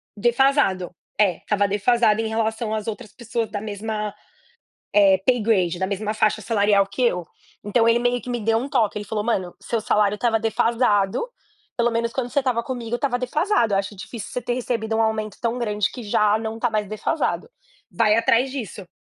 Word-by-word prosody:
defasado. 240 - +2 0.2
É, 200 -4 +3
estava 205 -1 0
defasado 215 +2 +2
em 220 - -2
relação 220 0 -1
às 215 0 -3
outras 215 -1 -6
pessoas 230 -1 -4
da 205 - -3
mesma 210 0 -4 1.1
paygrade 210 -8 +2
da 190 - 0
mesma 205 +2 -2
faixa 215 0 +1
salarial 205 -2 +3
que 200 +5 -6
eu. 180 -7 +1 0.4
Então, 225 +3 +2
ele 230 - +4
meio 245 0 0
que - - -9
me 240 -1 -1
deu 225 +1 +1
um 265 - -5
toque. 235 -8 +1
Ele 210 - -5
falou: 210 0 -2
"Mano, 190 -6 -1
seu 230 - -2
salário 210 -1 +2
estava 225 0 +1
defasado. 225 - +1 0.5
Pelo 240 0 +2
menos 230 0 -1
quando 250 -2 -2
você 280 - -8
estava 255 -4 0
comigo 240 -2 -4
estava 245 -1 0
defasado. 250 - +1
Eu 195 - +3
acho 200 +1 -5
difícil 205 +2 -8
você - - -2
ter 240 - -2
recebido 230 -3 -2
um 225 - +2
aumento 215 -2 -1
tão 235 +1 -1
grande 210 -4 -1
que 245 - -8
já 210 0 +2
não 220 0 -4
está 240 +1 0
mais 215 -2 -1
defasado. 255 - -2 0.4
Vai 215 -2 +3
atrás 235 +3 +3
disso." 215 -7 -6
220 Hz, 190 wpm, -23 LUFS, 210-240 Hz, 1.1 s, ele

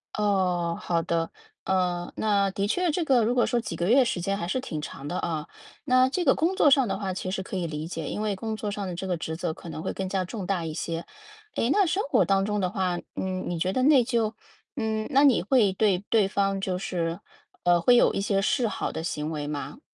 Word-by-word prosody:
哦， 180 -5 +1
好 170 -1 0
的。 165 -1 -1 0.3
嗯， 180 -2 0
那 200 -2 +2
的 200 +1 -1
确 355 - +1
这 335 +2 0
个 255 -6 +3
如 240 +3 +1
果 245 - +4
说 240 - +1
几 210 -7 -5
个 175 +4 -1
月 255 +1 +6
时 180 -6 -2
间 195 +2 -1
还 170 - -3
是 255 +8 0
挺 155 - -5
长 140 -1 -7
的， 180 - -3
啊。 160 -2 -3 0.4
那 255 -1 +4
这 355 +5 -1
个 265 - +6
工 350 +4 0
作 295 -7 +5
上 270 -4 +5
的 - - -2
话 195 -2 -3
其 185 0 -4
实 190 0 -3
可 190 - -5
以 170 -2 -2
理 155 +1 -5
解， 165 -3 -5
因 210 - -3
为 210 -2 -1
工 220 +3 -4
作 210 -1 -4
上 200 -2 -4
的 175 - -4
这 190 - -5
个 180 -2 -1
职 160 0 -4
责 165 -1 -2
可 170 - -12
能 160 0 -6
会 - - -2
更 190 -1 -3
加 190 -1 0
重 190 0 -6
大 185 -3 0
一 155 - -4
些。 165 +1 -4 0.5
诶， 230 - +1
那 400 +7 +4
生 375 +4 0
活 - - +4
当 195 0 +2
中 210 0 -1
的 185 - +1
话， 185 -3 -1 0.2
嗯， 185 -1 -3
你 170 -2 -2
觉 185 +3 0
得 255 - +1
内 275 -3 +6
疚 230 -2 0 0.4
嗯， 220 -4 -2
那 275 +2 +5
你 265 -9 +5
会 210 -3 +3
对 195 -3 +2
对 215 -4 +4
方 195 -1 0
就 185 -2 -1
是 170 -2 -2 0.4
呃， 175 -1 +4
会 245 +6 +5
有 - - +4
一 195 - -1
些 195 -1 +1
示 235 +3 +1
好 - - -3
的 160 - -5
行 155 -2 -3
为 150 -2 -3
吗？ 145 - -5
195 Hz, 270 characters per minute, -26 LUFS, 175-230 Hz, 0.5 s, 月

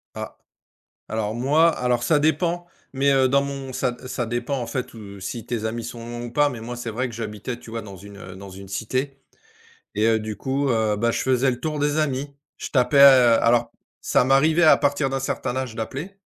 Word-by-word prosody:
Ah. - - -7 0.7
Alors 110 -1 -2
moi 150 +7 +4
alors 125 -1 0
ça 155 -3 +3
dépend, 170 +3 0 0.3
mais 140 +1 +2
heu, 135 -1 +4
dans 140 +2 +3
mon 135 -2 -5
ça 125 -2 -1
ça 120 -2 -3
dépend, 120 +4 -2
en 120 - -4
fait, 130 -1 -4
heu, 100 -2 -10
si 115 +4 -6
tes 115 -2 -3
amis 115 +1 -3
sont 120 0 -7
loin 120 0 -6
ou 120 - -8
pas 145 +2 +3
mais 120 -4 -7
moi, 120 +2 -6
c'est 120 -1 -5
vrai 125 +3 -2
que 115 - -9
j'habitais, 115 +2 -5
tu 115 - -13
vois, 115 0 -4
dans 100 -2 -10
une, 100 +2 -12
heu, 95 -1 -10
dans 100 0 -10
une 95 +1 -11
cité 130 +7 -3 0.8
et 105 +2 +2
heu, 110 -1 +3
du 110 -1 -5
coup, 135 +5 -1
heu, 110 -3 +1
bah, 115 +2 +1
je - - -2
faisais 130 0 +2
le 125 - -5
tour 155 -2 -3
des 145 +1 0
amis. 140 -1 -2 0.2
Je - - -5
tapais 130 +1 +2
heu, 130 -4 +7
alors 120 0 +3 0.3
ça - - +2
m'arrivait 155 +6 +3
à 155 - +7
partir 145 -1 +1
d'un 135 0 -2
certain 130 -1 -3
âge 130 -4 -3
d'appeler 140 - -5
125 Hz, 225 wpm, -23 LUFS, 115-140 Hz, 0.8 s, heu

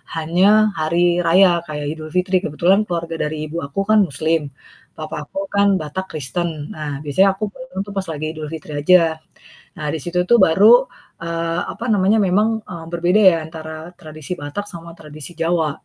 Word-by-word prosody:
hanya 195 +6 +3
hari 175 +2 +2
raya 175 0 +5
kayak 150 -1 -5
Idul 155 -1 -9
Fitri, 185 +1 +2
kebetulan 175 +7 +2
keluarga 170 -2 -4
dari 155 0 -5
ibu 165 - -5
aku 140 +7 -5
kan 215 - +5
muslim, 155 +1 -1 0.5
papa - - -6
aku 290 - -5
kan 200 0 +3
Batak 155 +5 -5
Kristen. 160 +4 -2 0.3
Nah 150 -2 -5
biasanya 190 +8 +4
aku - - -5
pulangnya 260 -5 -9
tuh 205 - -8
pas 190 - -2
lagi 155 0 -4
Idul 155 -1 -6
Fitri 155 -1 -8
aja. 165 -1 +4 0.6
Nah 150 - -4
di - - -2
situ 180 +1 0
tuh 235 - +6
baru, 220 +10 +6 0.4
eee, 165 0 -2
apa 230 - -8
namanya, 200 +2 +3
memang, 200 +3 +2 0.2
eee, 170 -2 -7
berbeda 175 +5 +2
ya 170 - +1
antara 160 +1 -9
tradisi 155 -1 -8
Batak 145 +8 -5
sama 170 0 -9
tradisi 150 +1 -9
Jawa. 165 -2 +1
170 Hz, 175 wpm, -19 LUFS, 155-190 Hz, 0.6 s, tuh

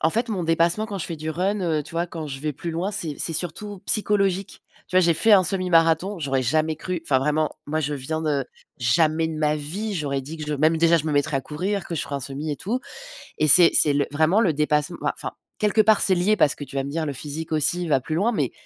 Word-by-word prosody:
en 160 - +2
fait 230 +4 0
mon 190 -6 -2
dépassement 170 +6 +2
quand 200 -3 -5
je - - -4
fais 165 - -5
du 155 +1 -4
run, 190 +5 -1
heu, 160 -4 0
tu - - -13
vois? 170 +1 -1
Quand 160 -3 -7
je 135 -1 -7
vais 150 0 -2
plus 170 +5 -6
loin, 175 +5 -2
c'est 160 -7 -4
c'est 165 - -1
surtout 185 +4 -4
psychologique. 200 -3 0 0.3
Tu 185 - -1
vois? - - +7
J'ai 170 -2 +3
fait 220 +7 +4
un 190 -2 +6
semi-marathon, 180 0 +2
j'aurais 135 -3 -1
jamais 155 +5 +1
cru, 180 +2 -4
enfin 130 -4 +2
vraiment, 150 +2 0 0.2
moi 155 +2 -1
je 145 0 -2
viens 155 +4 -3
de 145 -4 0 0.3
jamais 155 +6 +2
de 160 - -5
ma 150 -1 +1
vie 195 +9 -4
j'aurais 140 -4 -2
dit 155 +5 -8
que 150 - -5
je 150 - -1
même 155 +3 +2
déjà 170 0 +4
je 155 - -2
me 150 - -1
mettrais 145 0 +1
à - - -1
courir, 185 +5 -3
que 170 - -5
je - - -2
ferais 140 - -6
un - - -5
semi 140 +4 -5
et 145 - -3
tout 240 +7 -3 0.6
et 155 - +2
c'est 170 +4 +7
c'est 150 - +5
le 140 0 +1
vraiment 160 +7 +2
le 170 -7 +2
dépassement, 150 +2 0
mouais - - 0
enfin - - -6 0.3
quelque 215 +1 +3
part, 215 0 +4
c'est 185 - +3
lié 195 +5 +2
parce 150 -4 +3
que 145 - -7
tu 135 - -13
vas 135 - 0
me 140 - -5
dire: 160 0 -2
«Le 145 - -3
physique 155 +4 -6
aussi 170 +3 +1
va 135 -4 +2
plus 155 - -5
loin.» 220 +7 +1
Mais - - -1
160 Hz, 270 wpm, -23 LUFS, 150-185 Hz, 0.6 s, vois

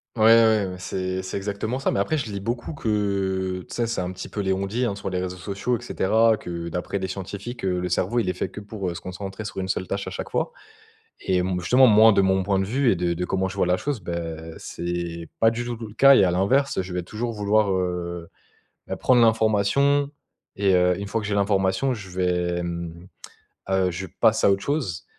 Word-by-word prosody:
Ouais, 110 - +1
ouais, 110 -2 +6
ouais. 90 - -6
C'est 95 0 -3
c'est 95 - -4
exactement 105 +5 -3
ça - - 0
mais - - 0
après, 155 +10 0
je 115 -6 -4
lis 100 - -4
beaucoup 120 +8 -4
que 95 -5 -1
tu - - -14
sais? 120 -1 0
C'est 115 - -2
un 90 0 -2
petit 95 - -8
peu 105 - -3
les 95 -1 +1
on-dit, 100 +6 -1
hein 105 - -1
sur 100 -1 -5
les 90 - -2
réseaux 90 0 -4
sociaux 100 +7 -2
et - - -14
cetera, 110 0 +2
que 85 -3 -6
d'après 90 +3 -3
des 95 - -3
scientifiques, 100 +5 -6
le 90 -1 -1
cerveau, 120 +7 +1
il 100 -6 0
est - - 0
fait - - -2
que - - -8
pour 100 -4 -5
se - - -7
concentrer 95 +3 -6
sur 105 - -7
une 95 - -3
seule 95 0 -2
tâche 100 -1 -3
à 95 - -4
chaque - - -5
fois - - -1 0.7
et 95 - 0
m 90 0 -1
justement, 125 +8 +5
moi, 110 0 +7
de 100 - +4
mon 95 0 +2
point 95 0 +1
de 95 - +1
vue 125 +5 +2
et 95 - +2
de 85 0 0
de 90 +1 -2
comment 95 0 0
je 95 - -8
vois 90 - +3
la 90 - +3
chose, 140 +3 -3
bah, 85 - -5 0.4
c'est - - -9 0.4
c'est 85 - -9
pas 115 - +6
du 115 +1 -3
tout 120 - -3
tout 115 -1 -7
le 105 - -13
cas 140 +4 +7
et 95 - +6
à 90 - +3
l'inverse, 120 +9 +2
je 90 -1 -5
vais 90 - -1
toujours 115 +6 -4
vouloir, 105 -1 +2
heu, 90 -2 -2 0.6
beh, - - -4
prendre 125 -2 +4
l'information 115 +6 +3 0.5
et 100 -1 +3
heu, 90 +1 +3
une 100 - -5
fois 115 +2 -1
que 105 - -4
j'ai 100 - -1
l'information, 100 +5 +1
je 100 -5 -8
vais, 90 -1 0
mmh, 85 0 -6 0.6
heu, 95 -1 +2
je 90 +2 -5
passe 110 -1 +4
à - - +6
autre 100 0 +1
chose 100 - -2
100 Hz, 240 wpm, -24 LUFS, 90-110 Hz, 0.7 s, moi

